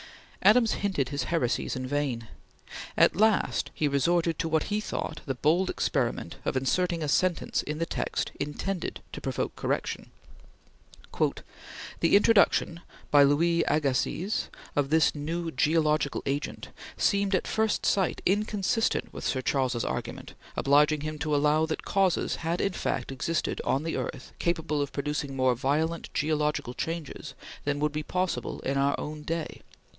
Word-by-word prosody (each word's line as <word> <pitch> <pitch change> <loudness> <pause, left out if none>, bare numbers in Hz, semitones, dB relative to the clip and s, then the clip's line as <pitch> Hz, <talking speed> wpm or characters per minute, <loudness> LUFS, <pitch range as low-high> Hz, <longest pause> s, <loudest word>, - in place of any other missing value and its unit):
Adams 220 +3 +5
hinted 185 -10 -1
his 140 0 -2
heresies 130 -8 0
in 130 0 -3
vain. 130 -4 -2 0.7
At - - +5
last 215 +1 +2
he 155 - +1
resorted 165 +4 +1
to 165 - -1
what 160 -1 +2
he 210 +1 -1
thought - - -4
the 135 - -1
bold 165 +8 +2
experiment 120 - -1
of - - -1
inserting 170 +5 0
a - - -1
sentence 175 +4 +1
in 150 +1 -4
the 165 - 0
text, - - -2
intended 175 +5 -3
to - - -6
provoke - - -2
correction. - - -2 1.9
"The - - +4
introduction 200 -5 +4 0.3
[by 145 - +7
Louis 165 +4 +4
Agassiz] 155 +7 0 0.3
of 145 -1 +1
this 155 -3 +4
new 165 +3 -3
geological 155 -2 +1
agent 140 +2 -3 0.3
seemed 200 -1 +2
at - - 0
first 220 -1 0
sight 190 -3 +1
inconsistent 210 +3 +1
with - - -7
Sir 130 -2 -1
Charles's 130 -4 0
argument, - - -5 0.2
obliging 150 +2 +4
him 155 0 -4
to 150 0 0
allow 150 +2 +3
that 160 - -4
causes 190 -3 +1
had 170 +1 -2
in 195 - 0
fact - - -2
existed 155 +5 -1
on 135 +3 +1
the 165 - -2
earth 130 - -5
capable 160 -4 0
of 140 - -2
producing 140 -1 -2
more 130 -1 +3
violent 150 +6 -1
geological 150 -4 0
changes 165 +1 -5 0.3
than 145 0 0
would 150 0 +1
be 150 0 -2
possible 180 -7 -2
in 135 +1 -1
our 140 +1 +2
own 150 0 -5
day." 165 +1 -4
155 Hz, 150 wpm, -28 LUFS, 140-175 Hz, 1.9 s, by